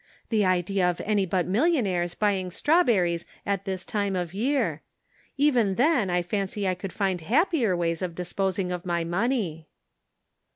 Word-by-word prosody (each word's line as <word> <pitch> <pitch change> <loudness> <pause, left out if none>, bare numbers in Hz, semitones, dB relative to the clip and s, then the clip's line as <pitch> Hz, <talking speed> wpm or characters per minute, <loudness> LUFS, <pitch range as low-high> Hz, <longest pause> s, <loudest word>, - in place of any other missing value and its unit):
The 220 -3 +2
idea 185 0 +2
of 175 - -3
any 205 -2 +1
but 180 0 0
millionnaires 195 - +1
buying 195 -3 0
strawberries 190 - +2 0.2
at 200 -1 -1
this 190 -1 -4
time 200 -2 -1
of 175 -2 -3
year! 265 +8 0 0.6
Even 245 -9 +3
then 250 - +2
I 175 0 +1
fancy 200 +2 -2
I 185 - +2
could 180 +1 -6
find 190 -3 -1
happier 245 - +2
ways 165 -1 -1
of 175 -2 -3
disposing 185 +1 -2
of 180 -1 -4
my 170 -2 -1
money." 175 - -1
190 Hz, 155 wpm, -26 LUFS, 180-215 Hz, 0.6 s, Even